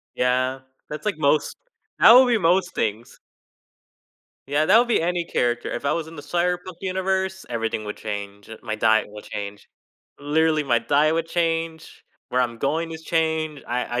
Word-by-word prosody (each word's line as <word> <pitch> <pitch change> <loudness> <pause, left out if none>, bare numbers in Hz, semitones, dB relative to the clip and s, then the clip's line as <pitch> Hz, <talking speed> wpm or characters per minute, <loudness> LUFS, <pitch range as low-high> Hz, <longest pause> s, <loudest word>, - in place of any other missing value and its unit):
Yeah, 130 +1 0 0.3
that's 150 +5 -7
like 200 -7 -1
most 150 0 +1 0.4
that - - +9
would 255 +1 +8
be 235 -2 +3
most 180 0 +2
things. 110 +2 -3 1.3
Yeah, 145 +2 +1
that 205 +6 +6
would 240 +1 +2
be 235 - +2
any 175 +1 -1
character. 120 -6 -1
If - - -4
I - - +2
was 165 -2 -3
in 165 +1 -11
the 145 - -8
Cyberpunk 180 +3 -2
universe, 190 0 -2
everything 115 -2 -2
would 105 - -5
change 100 -1 -7
it 110 - -11
My 110 -2 -3
diet 110 0 +3
will 105 0 -11
change. 100 0 -7 0.5
Literally, 155 +2 +1
my 125 -4 +2
diet 150 +6 +2
would 165 0 -1
change, 165 -1 -2 0.2
where 125 - +1
I'm 120 -2 -3
going 160 +6 -1
is 160 0 -8
change. 160 -2 -1
I 120 0 -2
155 Hz, 175 wpm, -23 LUFS, 120-170 Hz, 1.3 s, that